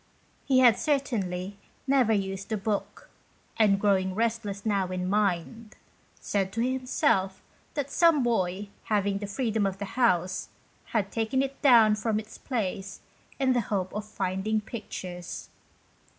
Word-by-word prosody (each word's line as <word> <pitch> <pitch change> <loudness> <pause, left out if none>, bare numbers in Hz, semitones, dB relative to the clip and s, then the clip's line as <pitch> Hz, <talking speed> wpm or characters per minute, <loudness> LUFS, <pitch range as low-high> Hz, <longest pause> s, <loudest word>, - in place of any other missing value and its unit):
He 265 -2 +3
had 245 -4 +6
certainly 200 - -1 0.3
never 265 -4 +3
used 195 -1 -1
the 220 - 0
book, 205 0 -3 0.5
and 205 -3 +4
growing 190 -2 +2
restless 220 -3 -2
now 200 -3 +1
in 180 0 -3
mind, 210 +3 -1 0.4
said 195 -2 -1
to 230 - -1
himself 250 - 0 0.3
that 285 -2 -2
some 330 -5 +4
boy 200 -4 0 0.2
having 200 -2 +1
the 205 - -5
freedom 220 0 -1
of 195 0 -4
the 200 - -4
house, 185 -7 +1 0.4
had 205 -4 -1
taken 225 +4 0
it 275 0 -6
down 230 -6 +7
from 215 0 0
its 215 0 -10
place 200 -5 -3 0.4
in 265 -2 +2
the 245 - +2
hope 190 -4 -2
of 210 - -3
finding 210 +1 -1
pictures. 185 -5 -7
210 Hz, 140 wpm, -27 LUFS, 195-235 Hz, 0.5 s, down